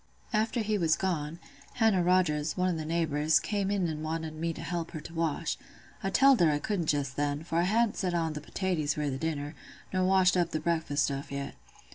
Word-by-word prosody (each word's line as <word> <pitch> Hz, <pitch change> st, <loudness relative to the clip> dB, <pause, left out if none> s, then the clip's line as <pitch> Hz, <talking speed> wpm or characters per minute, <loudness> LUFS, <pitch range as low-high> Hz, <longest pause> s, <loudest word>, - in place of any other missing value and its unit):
"After 220 Hz, +2 st, +1 dB
he 215 Hz, -1 st, 0 dB
was 165 Hz, -2 st, +3 dB
gone, 165 Hz, -4 st, -2 dB, 0.4 s
Hannah 225 Hz, -6 st, +3 dB
Rogers, 170 Hz, -4 st, +2 dB
one 180 Hz, 0 st, +2 dB
o' 160 Hz, -1 st, -3 dB
th' -, -, -7 dB
neighbours, 155 Hz, -2 st, +2 dB
came 200 Hz, -2 st, -1 dB
in 200 Hz, -3 st, +1 dB
and 155 Hz, -1 st, -4 dB
wanted 160 Hz, 0 st, -3 dB
me 165 Hz, +2 st, -2 dB
to -, -, -8 dB
help 170 Hz, -2 st, -3 dB
her 155 Hz, -, -4 dB
to 160 Hz, +2 st, -10 dB
wash. 165 Hz, -1 st, -1 dB, 0.4 s
I 195 Hz, -, -1 dB
telled 270 Hz, +5 st, +5 dB
her 170 Hz, -, +5 dB
I 150 Hz, -, +2 dB
couldn't 175 Hz, +1 st, -2 dB
just 140 Hz, -3 st, 0 dB
then, 145 Hz, +1 st, -1 dB
for 165 Hz, 0 st, -1 dB
I 175 Hz, -, +3 dB
hadn't 230 Hz, 0 st, +2 dB
set 180 Hz, -2 st, -1 dB
on 165 Hz, -2 st, 0 dB
th' 150 Hz, -, -5 dB
potaties 155 Hz, -3 st, -1 dB
for 150 Hz, -1 st, -1 dB
th' 135 Hz, -1 st, -2 dB
dinner, 150 Hz, -1 st, -3 dB, 0.4 s
nor 185 Hz, 0 st, +2 dB
washed 190 Hz, 0 st, +4 dB
up 175 Hz, -2 st, +1 dB
th' 155 Hz, -, -2 dB
breakfast 160 Hz, -4 st, +1 dB
stuff 140 Hz, 0 st, -3 dB
yet. 140 Hz, 0 st, -4 dB
165 Hz, 220 wpm, -29 LUFS, 150-185 Hz, 0.4 s, telled